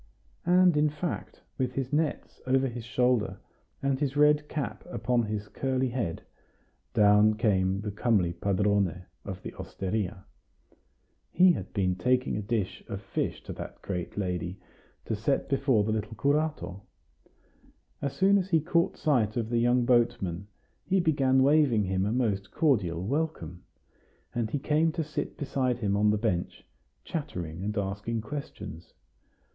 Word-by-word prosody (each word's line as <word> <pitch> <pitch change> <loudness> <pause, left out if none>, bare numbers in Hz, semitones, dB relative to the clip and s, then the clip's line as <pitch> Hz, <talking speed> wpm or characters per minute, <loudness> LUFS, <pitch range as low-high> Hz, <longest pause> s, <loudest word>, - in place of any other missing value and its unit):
And 180 -1 +5
in 150 0 +4
fact, 150 +3 -5 0.2
with 125 -1 0
his 135 +1 -3
nets 150 0 -1
over 135 +1 +3
his 120 -2 -6
shoulder, 125 -6 +1 0.5
and 135 -1 +1
his 145 -1 -1
red 150 0 +4
cap 150 -3 -4
upon 125 -8 +1
his 105 -2 -3
curly 130 +2 -1
head, 120 -9 -3 0.7
down 105 +1 +5
came 95 -4 +1
the 105 -1 -4
comely 100 -5 +1
padrone 100 -1 0 0.2
of 95 -2 -7
the - - -6
osteria. 95 0 -4 1.1
He 185 0 +6
had - - -4
been 95 -3 +1
taking 125 +6 +1
a 105 - -2
dish 105 -2 -2
of - - -4
fish - - -3
to - - -6
that - - -9
great 90 -1 -4
lady, 90 -1 -2 0.5
to 110 - -1
set 115 +6 0
before 135 -5 +2
the 110 - -1
little 110 0 -3
curato. 145 - 0 1.2
As 140 - -2
soon 200 +1 +4
as 190 0 -3
he 165 -3 +4
caught 170 +2 +1
sight 125 -7 +1
of 115 -2 -1
the 120 - +2
young 120 +1 +3
boatman, 100 -7 +1 0.4
he 190 +1 +2
began 135 -6 +3
waving 140 -6 +4
him 95 0 0
a - - 0
most 105 -6 0
cordial 95 - +1
welcome; 125 - -2 0.7
and 115 -2 -1
he 145 - -1
came 155 +3 +2
to 165 - -1
sit 150 0 -4
beside 130 -3 0
him 100 -4 0
on 105 +1 +3
the 105 - +3
bench, 100 -5 -2 0.4
chattering 90 - -5
and 105 +2 -2
asking 100 +3 -2
questions. 120 - -8
115 Hz, 150 wpm, -28 LUFS, 100-140 Hz, 1.2 s, He